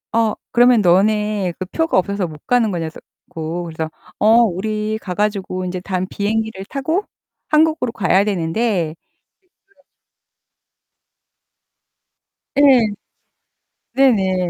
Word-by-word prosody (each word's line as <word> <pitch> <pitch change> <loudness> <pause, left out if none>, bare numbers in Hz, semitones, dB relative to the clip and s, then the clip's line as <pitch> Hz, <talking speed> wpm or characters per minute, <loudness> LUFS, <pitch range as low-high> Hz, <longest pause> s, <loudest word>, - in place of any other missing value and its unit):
"어 225 -2 +2 0.2
그러면 245 -2 +5
너네 205 0 +2
그 185 - -3
표가 325 - 0
없어서 195 0 0
못 150 -2 -12
가는 240 -4 +2
거냐?" 170 -2 -2
그래서 - - -13 0.3
고. 165 +2 -4
그래서 160 -1 -5 0.3
"어. 225 +3 +5
우리 215 +2 -2
가 180 - -5
가지고 195 -2 -2
인제 180 0 -4
다음 185 -1 -2
비행기를 215 -1 -2
타고 315 - -2 0.5
한국으로 310 -5 +2
가야 195 -2 +2
되는데" 190 -1 -1
이 - - -13 0.7
그래 395 - -34
가지 - - -31 2.7
예. 285 - +4 1.3
네네. 190 -9 +2
205 Hz, 240 characters per minute, -19 LUFS, 180-225 Hz, 2.7 s, 그러면